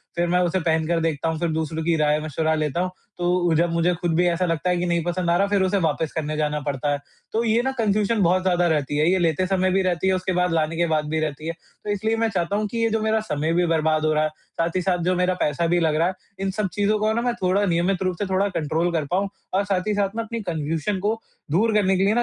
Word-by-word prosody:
फिर 175 0 +1
मैं 180 +1 +2
उसे 180 +1 +1
पहन 160 -2 +1
कर 170 -1 +1
देखता 160 -1 -1
हूँ 160 -1 -3
फिर 170 0 0
दूसरों 160 0 -2
की 165 +1 +2
राय-मशवरा 155 +1 +1
लेता 155 +2 -1
हूँ। 185 - -2 0.3
तो 175 - -1 0.2
उ - - +3
जब 170 +2 +2
मुझे 170 +1 +2
ख़ुद 170 0 -1
भी 175 +2 +3
ऐसा 175 +1 +1
लगता 165 0 -1
है 180 - +2
कि 175 - -1
नहीं 170 -1 0
पसंद 175 0 -1
आ 170 - +3
रहा 200 - +3
है 200 - -5
फिर 205 -1 +2
उसे 190 +2 +1
वापस 160 -2 0
करने 155 -1 -2
जाना 150 0 0
पड़ता 145 0 -2
है। 145 - +1 0.4
तो 225 +2 +1
ये 230 +1 +2
न 265 - +1
कन्फ़्यूजन 215 0 +1
बहुत 180 +2 +3
ज़्यादा 175 -1 +2
रहती 145 -3 0
है। 155 +3 +3
ये 190 - +2
लेते 170 +1 +1
समय 185 -1 +1
भी 195 +1 +2
रहती 185 0 0
है, 190 - +3
उसके 185 0 -2
बाद 180 0 +1
लाने 160 0 0
के 170 - +2
बाद 155 -1 0
भी 160 +1 0
रहती 155 0 -3
है। 165 - -2
तो 175 - -13
इसलिए 220 +2 0
मैं 225 0 +1
चाहता 195 -1 -1
हूँ 210 +1 0
कि 235 - -3
ये 230 - +3
जो 220 0 0
मेरा 220 0 +2
समय 150 +2 0
भी 175 +1 +2
बर्बाद 155 -1 +1
हो 155 - +2
रहा 155 0 +2
है। 155 - +1
साथ 165 +2 -5
ही 185 - +1
साथ 180 0 +1
जो 180 +1 +1
मेरा 180 +1 +2
पैसा 150 +3 +1
भी 175 +1 +2
लग 160 -2 +1
रहा 165 +3 +2
है। 185 - -1 0.3
इन 195 0 -1
सब 210 +1 -1
चीज़ों 205 +1 +1
को 215 +1 +1
न 235 +1 -1
मैं 245 - +1
थोड़ा 190 +2 +2
नियमित 180 +1 +1
रूप 185 -1 0
से 205 - 0
थोड़ा 195 +2 +2
कंट्रोल 160 +3 0
कर 160 -3 -1
पाऊँ 195 +2 +1 0.2
और 195 +2 +2
साथ 195 0 -1
ही 210 - +1
साथ 200 0 0
मैं 230 - -1
अपनी 230 +1 -5
कन्फ़्यूजन 160 +5 -2
को 215 +3 -1 0.3
दूर 220 +8 +2
करने 195 -3 +3
के 190 - +2
लिए 205 - +3
175 Hz, 290 wpm, -23 LUFS, 160-195 Hz, 0.4 s, उ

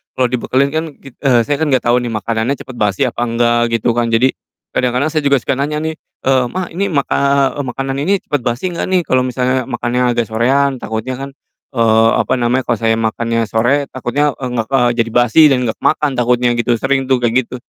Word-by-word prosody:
kalo 130 - +2
dibekelin 130 +3 0
kan 160 +1 0
kit 135 -2 -14
eee, 125 -3 +4
saya 145 - +1
kan 160 - 0
gak 130 -2 +2
tau 120 - +4
nih 120 -1 -4
makanannya 115 +5 -1
cepet 130 - -10
basi 105 +5 +1
apa 120 - -4
enggak 120 0 +1
gitu 115 +1 +1
kan. 120 -1 +1
Jadi 125 +4 +3 0.4
kadang-kadang 125 +3 +1
saya 155 -2 -1
juga 140 -2 +3
suka 130 - -2
nanya, 150 +2 -1
eee, 160 0 -3 0.6
"Ma, 185 -1 -3 0.2
maka 140 -3 0 0.4
eee, - - -1
makanan 135 +2 -3
ini 195 +3 +1
cepet 145 -3 -2
basi 125 +10 -2
gak - - -2
nih?" 180 -2 +2
Kalau 130 0 +2
misalnya 130 +1 0
makannya 125 0 0
agak 120 -1 +1
sorean 130 +3 +1
takutnya 110 +4 -3
kan, 135 0 -5 0.5
eee, 115 -1 +4
apa - - -1
namanya, 125 +2 +1
kalo 120 - +2
saya 115 0 +2
makannya 115 +1 -1
sore 135 +6 +1
takutnya 140 +3 -1
enggak 125 -4 -3
eee, 125 -2 +3
jadi 115 0 +1
basi 120 +5 +4
dan 130 - +3
gak 110 - -3
ke - - -21
makan 150 -2 +1
takutnya 125 0 +2
gitu, 120 0 +1
sering 135 -1 0
tuh 130 -2 +3
kayak 120 +1 +2
gitu. 125 - -8
125 Hz, 210 wpm, -16 LUFS, 120-140 Hz, 0.6 s, eee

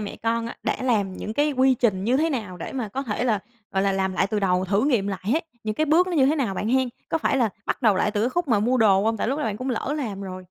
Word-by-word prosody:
mẹ 205 - -5
con 230 0 -1
á 235 - -7
đã - - 0
làm 210 -7 +1
những 215 +3 -6
cái 295 +2 +2
quy 260 0 +4
trình 205 -6 0
như 245 +3 +2
thế 320 +3 +1
nào 215 - -4
để 165 - -7
mà 250 -5 -3
có 265 +7 -4
thể 235 -2 -2
là, 225 -4 +2 0.3
gọi 190 - +1
là, 195 0 +2
làm 190 -1 0
lại 190 +1 +1
từ 210 0 -2
đầu, 185 -1 +1
thử 200 +6 +1
nghiệm 235 -9 +1
lại 195 -2 -4
hết, 285 - +1 0.2
những 215 - -2
cái 310 - 0
bước 335 +5 +4
nó 365 - -4
như 275 -5 +4
thế 305 - +2
nào 235 -10 -1
bạn 210 - -2
hen? 260 +1 +2 0.2
Có 325 - 0
phải 290 - +1
là 240 -4 +3 0.2
bắt - - -2
đầu 215 -5 +4
lại 205 - +1
từ 205 0 -1
cái 235 - +2
khúc 345 0 -1
mà 215 -4 +3
mua 245 +5 +2
đồ 200 -3 +4
không, 225 0 +1
tại 220 - -1
lúc 275 - -1
đó - - -1
bạn 210 -2 -2
cũng 255 +2 -3
lỡ 255 +5 -2
làm 215 -9 -4
rồi? 185 -1 -6
225 Hz, 325 wpm, -24 LUFS, 200-265 Hz, 0.3 s, quy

